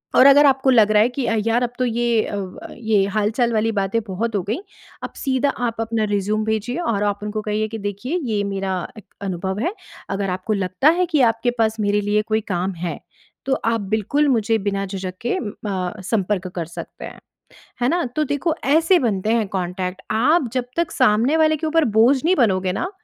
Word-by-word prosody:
और 255 - +7
अगर 280 +1 +8
आपको 270 -1 +3
लग 220 -5 +5
रहा 210 0 +5
है 235 - +1
कि 250 +1 -3
अ, 225 - +1
यार 230 +2 +2
अब 245 - 0
तो 255 - +2
ये 235 -1 +1
अ, - - -5
ब 190 -2 -7
ये 220 -3 +2
हाल-चाल 225 +3 +1
वाली 225 +1 +1
बातें 200 +1 0
बहुत 215 +4 -2
हो 200 - +1
गईं 225 - -1 0.4
अब - - -6
सीधा 265 0 0 0.2
आप 230 -1 -4
अपना 225 -1 -1
रेज़्यूमे 210 +2 0
भेजिए 220 +4 -2
और 230 -12 0
आप 205 -1 0
उनको 210 +1 -3
कहिए 215 +1 -1
कि 225 +1 -6
देखिए, 205 - -3
ये 215 -5 -1
मेरा 195 -1 -2
अ, 220 - -10 0.2
अनुभव 190 0 -3
है। 340 - -1 0.4
अगर 195 0 -2
आपको 185 +4 -2
लगता 185 - +2
है 365 - +3
कि 315 -5 +1
आपके 235 +2 -2
पास 220 0 +1
मेरे 205 0 +1
लिए 205 +1 +1
कोई 220 0 +1
काम 180 +2 -1
है 165 - -4 0.5
तो 270 - +1
आप 230 -1 +1
बिल्कुल 220 +9 0
मुझे 225 -3 +2
बिना 195 0 -2
झिझक 190 -1 -5
के 240 - -1
अ, - - -2 0.6
संपर्क 195 -1 -1
कर 170 -2 -2
सकते 170 - -9
हैं। - - -10 0.6
है 245 - +3
ना? 345 +4 +1
तो 305 - +2
देखो 290 +3 -1
ऐसे 330 +6 +4
बनते 215 - 0
हैं 225 -2 +1
कॉन्टैक्ट 185 0 -3
आप 255 +6 +3
जब 255 -2 -1
तक 340 -1 0
सामने 230 +8 +3
वाले 315 -1 +3
के 315 - -4
ऊपर 325 0 +3
बोझ 245 +5 +6
नहीं 365 +3 +3
बनोगे 190 - +2
ना 350 - -3
220 Hz, 210 wpm, -21 LUFS, 200-255 Hz, 0.6 s, अगर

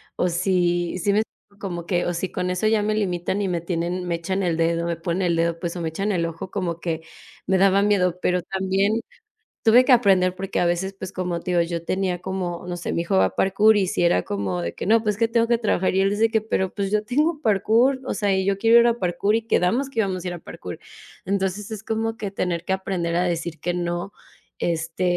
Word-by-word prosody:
o - - +1
si", 175 0 +1
¿sí 200 +3 +1
me 210 - +3
explico?, 205 -2 -8
como 175 -4 -5
que 175 0 0
o 175 - -1
si 180 +2 -2
con 180 - -2
eso 180 +3 -1
ya 215 -1 +3
me 210 +1 0
limitan 190 -1 -1
y - - 0
me 175 -2 -1
tienen 175 +1 -2
me 170 - 0
echan 190 +4 -2
el 170 -3 0
dedo, 170 0 +1
me 170 - -1
ponen 170 +3 -2
el 170 - +1
dedo, 165 0 0
pues 170 -1 -4
o 175 - -4
me 165 - -1
echan 195 +6 -2
el 170 -3 0
ojo, 165 +2 -6
como 175 -4 -3
que 165 -1 -3 0.4
me 190 - +2
daba 195 +1 +4
miedo, 180 -4 +2
pero 180 0 +1
también 195 +4 0 0.6
tuve 235 +2 +7
que 260 - +2
aprender 195 -7 +4
porque 190 0 -3
a - - +2
veces, 175 +3 0
pues, 190 -1 -6
como 180 -2 -3
te 180 - -4
digo, 175 -1 +3
yo 170 0 -3
tenía 185 0 -1
como, 180 -2 -4
no 175 - -3
sé, 175 - -4
mi - - 0
hijo 170 - 0
va 95 - +5
a 95 - -4
parkour 210 +3 +4
y 195 -3 +2
sí - - -1
era 90 - +3
como 95 -3 -2
de 85 0 -3
que: - - -6
"No, 225 +1 +4
pues 210 -2 0
es - - -16
que 230 - +3
tengo 230 0 +2
que 235 - +4
trabajar", 210 -5 +1
y 190 - +2
él 195 - +3
dice 215 +3 +2
que: 220 0 +2
"Pero, 190 -3 -2
pues, 200 -2 -2
yo 210 +1 +1
tengo 300 +7 0
parkour, 230 +4 +3
o - - -2
sea, 205 -3 +1
y 190 0 +1
yo 195 0 +1
quiero 230 +3 +6
ir 235 - +5
a 235 - +1
parkour 190 +2 0
y 230 - +1
quedamos 230 +7 +1
que 235 -4 -4
íbamos 190 -4 -1
a - - -4
ir - - -5
a 175 - -7
parkour". 90 - -9 0.5
Entonces 195 +1 -1
es 215 -2 -6
como 225 0 -2
que 210 -3 -5
tener 175 -3 -2
que - - -4
aprender 185 -3 -2
a 180 - +2
decir 170 -2 -2
que 175 0 -2
no, 175 +2 -3 0.5
este, 165 +1 -2
185 Hz, 260 wpm, -23 LUFS, 175-205 Hz, 0.6 s, tuve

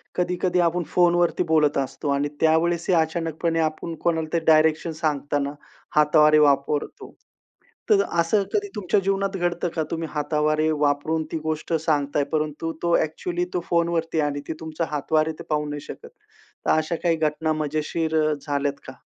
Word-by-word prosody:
कधी-कधी 180 0 0
आपण 175 0 +1
फोनवरती 175 0 +2
बोलत 155 -4 +2
असतो 140 +2 -3
आणि 140 +1 +1
त्यावेळेस 165 +2 +2
ही - - +4
अचानकपणे 165 0 0
आपण 160 +1 -2
कोणाला 160 -2 +1
ते 170 - +3
डायरेक्शन 155 +1 +3
सांगताना 145 -2 -1 0.4
हातवारे 150 0 +5
वापरतो. 145 0 0 0.8
तर 415 -2 +5 0.2
असं 185 +5 +2
कधी 410 -1 0
तुमच्या 205 0 +1
जीवनात 195 +1 -1
घडतं 175 0 -1
का? 160 - 0
तुम्ही 165 0 -3
हातावारे 155 +1 +1
वापरून 150 +1 0
ती 165 - -1
गोष्ट 155 +1 -3
सांगताय 145 -2 +1
परंतु 155 +1 -1
तो 170 0 +3
ॲक्चुअली 175 +3 -2
तो 180 - +1
फोनवरती 170 -1 0
आहे 150 - +2
आणि 145 0 -4
ती - - -2
तुमच्या 160 +1 -3
हातवारे 155 +2 +1
ते - - -7
पाहू 150 -1 0
नाही 145 0 -5
शकत. - - -10 0.6
तर - - +3
अशा 155 +2 +1
काही 170 -2 +3
घटना 155 0 0
मजेशीर 155 +1 -2
अ, 155 - +2
झाल्यात 140 -1 -1
का? 130 - -9
160 Hz, 160 wpm, -24 LUFS, 150-170 Hz, 0.8 s, हातवारे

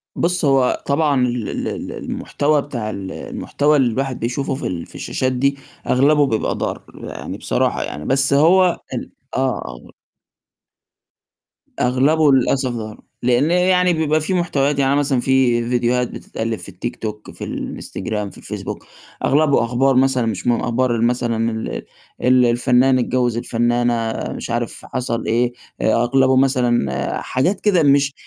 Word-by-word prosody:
بُص، 175 -1 +1
هو 135 -2 +2
طبعًا 140 -3 +2
ال 120 -4 -3
ال - - -3
ال - - -5
المحتوى 145 0 -1
بتاع 120 -7 -5
ال 95 -2 -6
المحتوى 150 +1 0
اللي 130 -4 +2
الواحد 135 +2 -2
بيشوفه 135 +4 -2
في 140 - -4
ال 85 -2 -4
في - - -17
الشاشات 130 0 -2
دي 140 +2 0 0.3
أغلبه 145 +3 +4
بيبقى 110 -4 -1
ضار - - -3
يعني - - -7
بصراحة - - 0
يعني، 75 - -6
بس 135 +1 +2
هو 175 +5 +4
ال 125 - -5 0.2
آه، - - -2 0.3
آه. - - -10 1.9
أغلبه 140 +5 +3
للأسف 130 0 +2
ضار، 110 -2 -7 0.2
لإن 125 +6 +2
يعني 180 0 +3
بيبقى 155 -1 +1
في 170 +5 -1
محتويات، 145 -5 +1
يعني 135 0 +2
مثلًا 140 -3 +1
في 120 -3 +2
فيديوهات 125 0 +1
بتتألّف 110 -1 -5
في - - -8
التيك 110 +6 -5
توك، 105 -2 -6
في - - -9
الإنستجرام، 105 -2 -4
في - - -15
الفيسبوك، - - -7 0.4
أغلبه 145 -2 +3
أخبار 130 +3 +2
مثلًا 130 -2 +3
مش 110 -1 -3
من 120 -1 +2
أخبار 120 0 0
ال 115 - 0
مثلًا 115 -1 0
ال 110 0 -4 0.4
ال 125 0 +5
الفنّان 125 +2 +3
اتجوِّز 120 -1 0
الفنّانة 120 -1 0 0.2
مش - - -6
عارف - - -3
حصل 115 -2 -3
إيه، 120 +2 +1 0.3
أغلبه 125 +4 +3
مثلًا 125 - +1
حاجات 180 +10 0
كده 185 -6 +3
مش 140 -1 +3
130 Hz, 150 wpm, -19 LUFS, 120-140 Hz, 1.9 s, ال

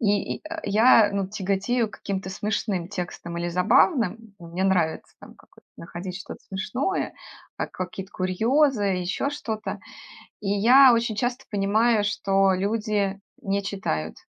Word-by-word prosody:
И 205 -3 +1
и, - - -16
э, 325 +1 -5
я, 215 0 +5
ну, 200 -1 -1
тяготею 200 +4 -1
к - - -13
каким-то 195 -1 -4
смешным 195 -2 -2
текстам 175 -3 -5
или 175 0 -2
забавным. 215 - +2
Мне 170 +2 -5
нравится 185 -4 0
там - - -14
какой-то - - -23
находить 175 +2 -7
что-то - - -9
смешное, 250 - -2 0.4
как - - -4
какие-то 185 +1 -6
курьезы, 225 +7 +2
еще 190 +7 -1
что-то. 220 -7 -4 0.6
И 210 - -6
я 245 +6 +7
очень 230 -1 0
часто 245 +1 -1
понимаю, 210 +2 +2
что 195 -1 +2
люди 200 0 -1 0.2
не 200 -2 -1
читают, 80 - -3
200 Hz, 140 wpm, -25 LUFS, 190-225 Hz, 0.6 s, я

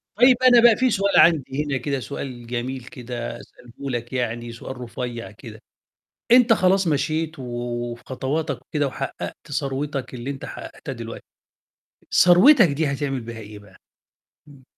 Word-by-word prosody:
طيب 250 +3 +6
أنا 245 -2 +7
بقى 235 -2 +7
في 255 0 +2
سؤال 200 -1 +2
عندي 150 -3 +3
هنا 140 -2 -1
كده 140 0 -2
سؤال 120 0 -7
جميل 125 +1 -4
كده 120 -4 -6
أسأله 125 +3 -11
لك 120 0 -4
يعني، 120 -1 -2
سؤال 125 +3 -8
رُفيّع 120 -4 -6
كده، 110 0 -12 0.7
أنت 245 -2 +7
خلاص 190 -1 +2
مشيت 155 +1 -1
و - - -6 0.5
وفي 120 +1 -10
خطواتك 135 +4 -3
وكده 145 -2 -1
وحقَّقت 140 - -6
ثروتك، 135 -1 -3
اللي 125 +2 -6
أنت 135 -1 -5
حقَّقتها - - -8
دلوقتي، - - -8 0.9
ثروتك 190 - +7
دي 150 +2 -1
هتعمل 135 -2 -2
بيها 115 0 -8
إيه 105 -1 -10
بقى؟ 100 -2 -18 0.7
إمم. 140 -3 -17
135 Hz, 150 wpm, -23 LUFS, 120-160 Hz, 0.9 s, أنا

